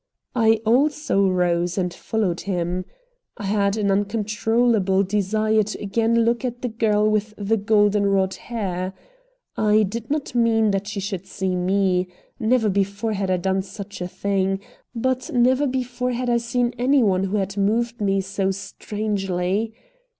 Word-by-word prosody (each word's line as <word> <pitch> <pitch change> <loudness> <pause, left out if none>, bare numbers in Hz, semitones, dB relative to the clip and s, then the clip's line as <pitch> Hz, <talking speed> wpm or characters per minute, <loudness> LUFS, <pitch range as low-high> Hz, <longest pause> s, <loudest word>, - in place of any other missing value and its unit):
I 225 -2 +3
also 255 -4 +2
rose 175 -1 +1
and 180 -2 -1
followed 200 -6 -2
him. 180 -1 -2 0.5
I 210 - -7
had 200 0 +1
an 200 -2 +1
uncontrollable 210 0 +1
desire 215 +2 +1
to 215 +1 -4
again 225 +3 +1
look 235 +2 +1
at 245 -1 -4
the 250 - 0
girl 215 -2 +2
with 215 0 0
the 205 +2 +1
golden 205 -1 +3
rod 190 -1 +2
hair. 190 -5 -4 0.6
I 215 0 +3
did 225 +3 -4
not 295 -2 -2
mean 225 -3 +3
that 195 0 -2
she 210 -1 -4
should 195 -1 -4
see 190 -1 -2
me. 185 0 +1 0.3
Never 230 -1 +2
before 200 +2 0
had 195 -2 -2
I 185 - +2
done 190 +2 0
such 200 0 -9
a 180 - -2
thing. 195 0 -1 0.4
But 255 +2 -1
never 255 +4 +3
before 250 -1 -2
had 245 0 -1
I 235 - +4
seen 240 +1 0
any 265 +1 +4
one 190 -2 +2
who 195 +2 -1
had 195 0 -2
moved 225 +4 0
me 195 -1 +2
so 195 0 -1
strangely. 195 0 -2
210 Hz, 155 wpm, -22 LUFS, 195-230 Hz, 0.6 s, I